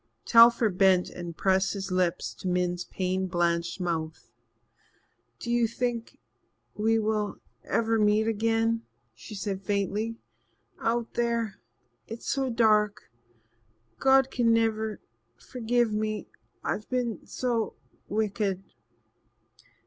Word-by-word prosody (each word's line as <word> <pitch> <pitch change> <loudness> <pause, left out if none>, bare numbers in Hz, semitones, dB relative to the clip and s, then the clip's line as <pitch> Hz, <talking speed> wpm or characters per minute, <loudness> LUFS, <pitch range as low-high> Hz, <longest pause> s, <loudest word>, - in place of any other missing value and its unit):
Telford 230 -4 +6
bent 190 -2 +4
and 170 -2 -7
pressed 190 0 +2
his 195 -2 -5
lips 180 -1 0
to - - -7
Min's 180 -1 0
pain 185 0 -2
blanched 170 0 0
mouth. 160 -8 -3 1.1
"Do 235 - -5
you 240 -1 +3
think 235 0 -3 0.6
we 225 +2 +2
will 215 -1 -1 0.3
ever 225 0 +1
meet 210 +1 +3
again?" 225 +1 +1 0.3
she 215 - -10
said 195 -1 -3
faintly. 205 +3 -1 0.6
"Out 230 0 -1
there 235 -4 -1 0.5
it's 225 +1 -8
so 270 -1 0
dark 215 - +2 0.9
God 270 0 +4
can 235 -2 +2
never 220 -2 +1 0.4
forgive 235 - 0
me 215 0 -2 0.4
I've 210 - -3
been 245 -3 -2
so 235 -3 -1 0.3
wicked." 205 -2 -1
215 Hz, 110 wpm, -28 LUFS, 190-230 Hz, 1.1 s, Telford